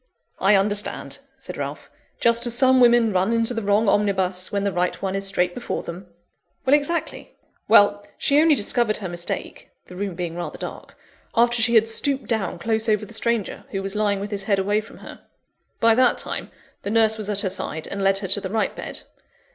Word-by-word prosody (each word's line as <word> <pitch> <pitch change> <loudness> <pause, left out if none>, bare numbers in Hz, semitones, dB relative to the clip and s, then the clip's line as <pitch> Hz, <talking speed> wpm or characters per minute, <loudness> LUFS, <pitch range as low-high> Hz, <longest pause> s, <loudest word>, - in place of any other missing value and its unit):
"I 200 +2 +4
understand," 205 +1 0 0.2
said - - -9
Ralph; - - -6 0.3
"just 235 +1 +3
as 235 - +3
some 260 0 +5
women 235 -3 +4
run 190 +4 +1
into 230 +1 +1
the 225 - -3
wrong 205 +1 +1
omnibus, 190 -3 0
when 200 -1 -1
the 200 - 0
right 180 0 -1
one 190 -1 -3
is 195 0 -2
straight 180 -2 0
before 245 - -4
them." 180 +3 -8 0.6
"Exactly. 290 +5 0 0.3
Well, 205 0 +5
she 285 +2 +3
only 320 -1 +5
discovered 215 -1 +1
her 195 - -5
mistake 175 0 -5 0.2
(the 180 - -12
room 195 -1 -4
being 170 -1 -4
rather 175 0 -6
dark), - - -9 0.4
after 235 0 +3
she 235 +1 +2
had 225 0 +5
stooped 275 +4 -1
down 215 -7 -2
close 220 +4 -1
over 210 -1 +1
the 225 - -13
stranger, 230 -2 -2
who 195 0 -4
was 195 +1 -4
lying 205 -2 +1
with 200 +2 -6
his 200 -1 -3
head 200 -1 +2
away 205 +2 0
from 215 - -15
her. - - -11 0.6
By 230 0 +5
that 250 +1 +3
time, - - -5 0.3
the - - -5
nurse 220 0 +2
was 210 -1 -4
at 205 -1 0
her 195 - -1
side, 160 -4 -3
and 200 - -5
led 195 0 +3
her 195 0 -2
to 200 +2 +2
the 190 - -5
right 220 +2 -1
bed. - - -7
205 Hz, 205 wpm, -22 LUFS, 195-230 Hz, 0.6 s, some